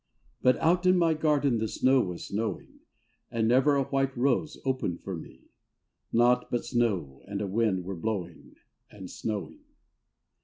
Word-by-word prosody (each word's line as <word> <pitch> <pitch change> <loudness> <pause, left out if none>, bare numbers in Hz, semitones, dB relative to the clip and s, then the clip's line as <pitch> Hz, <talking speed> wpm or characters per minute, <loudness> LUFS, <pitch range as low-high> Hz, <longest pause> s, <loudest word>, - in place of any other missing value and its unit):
— - - -38
But 125 - +4
out 180 +3 +2
in 185 0 +5
my 165 -2 +3
garden 145 -6 +1
the 110 - -1
snow 130 +4 +3
was 90 -5 -5
snowing 105 -1 -4 0.5
And 115 -1 0
never 130 +4 +4
a 140 - +2
white 135 -1 -1
rose 140 +4 +1
opened 130 -10 -1
for 95 - -4
me. 80 - -12 0.6
Nought 125 +1 +3
but 120 - -2
snow 105 - -1
and 100 0 -4
a 105 - -2
wind 100 -2 0
were 95 +1 -4
blowing 90 -4 -5 0.3
And 95 -3 -10
snowing. 110 - -4
120 Hz, 160 wpm, -28 LUFS, 100-135 Hz, 0.6 s, in